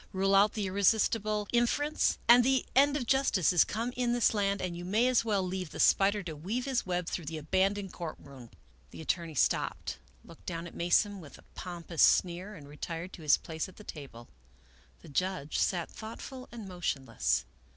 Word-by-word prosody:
Rule 195 +1 +1
out 200 +2 +5
the 210 -3 -2
irresistible 210 +2 +1
inference, 290 +6 +1
and 240 +1 +8
the 265 +1 +2
end 285 +2 +5
of 255 - -3
justice 235 - +2
is 175 - +6
come 230 +3 -3
in 245 -1 0
this 240 -1 +3
land; 200 -1 0
and 180 -2 -3
you 175 - -7
may 215 +7 +2
as 255 -3 +3
well 205 -4 0
leave 185 -2 -4
the - - -9
spider 200 +1 +4
to 165 -3 -6
weave 210 - -3
his 260 -7 -1
web 180 -1 -1
through 170 -1 -4
the 160 +2 -5
abandoned 190 +5 0
court 170 -3 -5
room." 130 -4 -13 0.4
The - - -10
attorney 165 0 -2
stopped, - - 0 0.3
looked 165 - -16
down 170 -1 -4
at 170 - -10
Mason 195 +4 +2
with 145 -5 -12
a - - -18
pom 175 -2 -7
pous 165 -1 -2
sneer, 185 +4 +3
and 145 -5 -12
retired 165 +4 -6
to - - -10
his 150 -2 +4
place 160 +3 -5
at 185 - -16
the 210 - -13
table. 135 - -10 0.8
The - - -12
judge 180 -1 -2
sat 175 -3 0
thoughtful 255 +4 -9
and 230 -4 -8
motionless. 145 -10 -1
190 Hz, 195 wpm, -30 LUFS, 170-220 Hz, 0.8 s, and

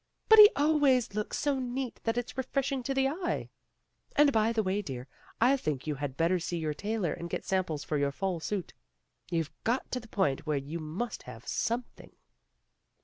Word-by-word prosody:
But 440 0 +9
he 415 0 +12
always 285 -6 +3
looks 210 0 -2
so 285 -2 0
neat 255 0 -3
that 225 +1 0
it's 245 - -3
refreshing 270 +1 -1
to 270 +2 -2
the 270 0 +3
eye. 345 +5 -3 0.6
And 295 -1 +6
by 220 -2 +3
the 225 -2 +1
way, 190 +2 0
dear, 130 -9 -6 0.3
I 250 +4 +5
think 150 - -3
you 155 - -1
had 140 -2 -5
better 170 +2 +2
see 175 +1 -3
your 155 -2 -1
tailor 205 -1 -2
and 170 - -6
get - - -4
samples 180 -6 -1
for 150 - -1
your 140 0 +1
fall 185 +3 -2
suit. 190 +2 -4 0.6
You've 165 -3 -1
got 240 +4 -1
to 250 - -1
the 225 - -13
point 155 -9 0
where 150 -2 +1
you 145 +5 -4
must 165 +10 -4
have - - -11
something." 240 +1 -3
210 Hz, 195 wpm, -30 LUFS, 160-255 Hz, 0.6 s, he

